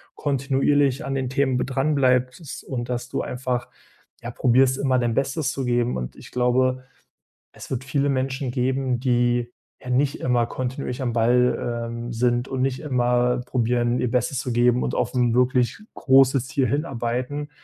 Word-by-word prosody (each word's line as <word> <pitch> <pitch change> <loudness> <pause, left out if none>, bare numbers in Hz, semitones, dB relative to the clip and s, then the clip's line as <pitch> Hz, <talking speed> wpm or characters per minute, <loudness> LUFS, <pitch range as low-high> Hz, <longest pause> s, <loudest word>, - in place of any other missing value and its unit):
kontinuierlich 140 0 +1
an 135 - -3
den 130 -2 -2
Themen 130 -1 +1
b 125 - 0
dranbleibst 135 0 0
und 120 -2 -5
dass 125 0 -3
du - - -2
einfach, 125 -1 -3 0.5
ja, 120 +1 -6
probierst, 130 +2 +3
immer 130 -2 +1
dein 120 -2 0
Bestes 135 +1 0
zu 135 - -4
geben. 120 0 +1
Und 60 -1 -5
ich - - -13
glaube, 130 +1 +1 0.7
es - - -11
wird 130 -1 -2
viele 140 +1 0
Menschen 130 -1 -1
geben, 130 0 0
die, 120 -1 +1 0.3
ja, 125 - -9
nicht 135 +3 +1
immer 120 -2 +2
kontinuierlich 130 +1 -4
am 120 -3 -1
Ball, 120 0 +1
ähm, 120 +1 -6
sind 120 +2 +1
und 130 -1 -3
nicht 130 -1 0
immer 125 -3 +1
probieren, 120 -1 0
ihr 120 - -1
Bestes 125 +1 0
zu 125 -2 -3
geben 120 +1 +3
und - - -2
auf - - -1
'n 120 -2 +2
wirklich 125 +2 +2 0.2
großes 135 -1 +4
Ziel 135 -2 0
hinarbeiten. 140 0 -2
125 Hz, 165 wpm, -23 LUFS, 120-135 Hz, 0.7 s, großes